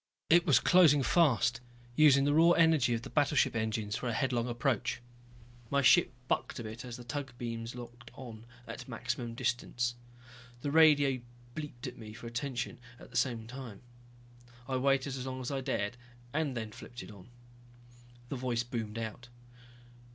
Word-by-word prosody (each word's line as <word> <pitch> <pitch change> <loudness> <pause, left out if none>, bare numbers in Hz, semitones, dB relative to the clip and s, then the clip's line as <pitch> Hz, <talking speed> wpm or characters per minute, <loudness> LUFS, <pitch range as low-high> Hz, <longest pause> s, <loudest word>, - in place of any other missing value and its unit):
It 175 +1 +6
was 140 -6 +6
closing 155 -6 +5
fast, 130 -5 +3 0.3
using 140 -3 +6
the 145 - +3
raw 165 +3 +6
energy 160 -8 +4
of 115 - -5
the - - -7
battleship 145 -4 +2
engines 110 -1 -1
for 125 +1 -3
a - - -1
headlong 125 0 0
approach. 120 -1 -1 0.7
My 140 0 +2
ship 175 +5 +6 0.2
bucked - - -1
a 120 - -5
bit 110 +2 -7
as 120 -1 -7
the 120 - -10
tug 130 0 -5
beams 115 0 -5
locked 120 0 -10
on 115 -3 -10 0.2
at - - -8
maximum 115 -1 -4
distance. 120 0 -1 0.7
The 145 - -2
radio 145 -5 +5 0.3
bleeped 145 -5 -7
at 125 -1 -7
me 110 -1 -9
for 120 - -11
attention 120 +1 -4 0.2
at - - -14
the - - -14
same 120 -2 0
time. 125 -3 -9 0.8
I 130 -1 -1
waited 135 0 +1
as 130 0 -5
long 130 0 -4
as 130 +1 -4
I 135 -1 -2
dared, 125 -4 -2 0.4
then 130 -8 -2
flipped 120 +3 -10
it - - -11
on. 100 +1 -14 1.0
The - - -3
voice 120 -2 -1
boomed 115 -3 -5
out. 115 +1 -5
125 Hz, 165 wpm, -32 LUFS, 115-140 Hz, 1.0 s, It